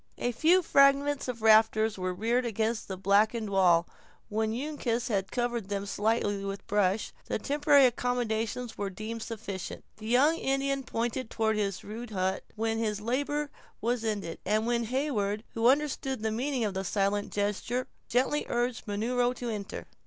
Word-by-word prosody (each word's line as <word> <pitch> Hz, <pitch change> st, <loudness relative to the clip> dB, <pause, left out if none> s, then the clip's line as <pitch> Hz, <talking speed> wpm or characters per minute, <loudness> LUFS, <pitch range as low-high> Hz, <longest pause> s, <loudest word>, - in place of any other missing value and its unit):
A 245 Hz, -, -1 dB
few 330 Hz, +9 st, +4 dB
fragments 280 Hz, -1 st, +4 dB
of 235 Hz, -3 st, -5 dB
rafters 220 Hz, 0 st, +5 dB
were 185 Hz, -1 st, -2 dB
reared 230 Hz, +7 st, 0 dB
against 225 Hz, -1 st, -1 dB
a 190 Hz, -, -4 dB
blackened 210 Hz, +3 st, +2 dB
wall; 175 Hz, -3 st, +4 dB, 0.4 s
and -, -, -7 dB
when 220 Hz, 0 st, +1 dB
Uncas 245 Hz, -2 st, -2 dB
had 195 Hz, -3 st, -1 dB
covered 240 Hz, -4 st, -2 dB
them 200 Hz, -1 st, -2 dB
slightly 205 Hz, -1 st, 0 dB
with 195 Hz, 0 st, -5 dB
brush, 205 Hz, 0 st, +1 dB
the -, -, -1 dB
temporary 285 Hz, +3 st, +4 dB
accommodations 245 Hz, -2 st, -1 dB
were 200 Hz, -1 st, -1 dB
deemed 215 Hz, +4 st, -6 dB
sufficient. 205 Hz, -5 st, -6 dB
The 215 Hz, 0 st, -8 dB
young 280 Hz, +8 st, +4 dB
Indian 275 Hz, -1 st, 0 dB
pointed 240 Hz, 0 st, -3 dB
toward 220 Hz, -2 st, 0 dB
his 200 Hz, -3 st, -2 dB
rude 225 Hz, +3 st, -7 dB
hut 190 Hz, -2 st, -1 dB
when 225 Hz, 0 st, -1 dB
his 210 Hz, -2 st, -1 dB
labor 285 Hz, +6 st, -1 dB, 0.3 s
was 235 Hz, +1 st, -1 dB
ended; 205 Hz, -7 st, -3 dB
and 215 Hz, +3 st, +1 dB, 0.2 s
Heyward, 220 Hz, -6 st, -1 dB
who 225 Hz, +1 st, +2 dB
understood 270 Hz, -3 st, +1 dB
the 220 Hz, -, 0 dB
meaning 255 Hz, +2 st, -1 dB
of 205 Hz, -, -2 dB
the 190 Hz, 0 st, -2 dB
silent 200 Hz, +2 st, 0 dB
gestures, 210 Hz, +5 st, -1 dB, 0.2 s
gently 265 Hz, +5 st, +1 dB
urged 240 Hz, 0 st, -1 dB
Munro 245 Hz, +4 st, +1 dB
to 245 Hz, -1 st, -5 dB
enter. 205 Hz, -2 st, -5 dB
225 Hz, 160 wpm, -29 LUFS, 205-250 Hz, 0.4 s, rafters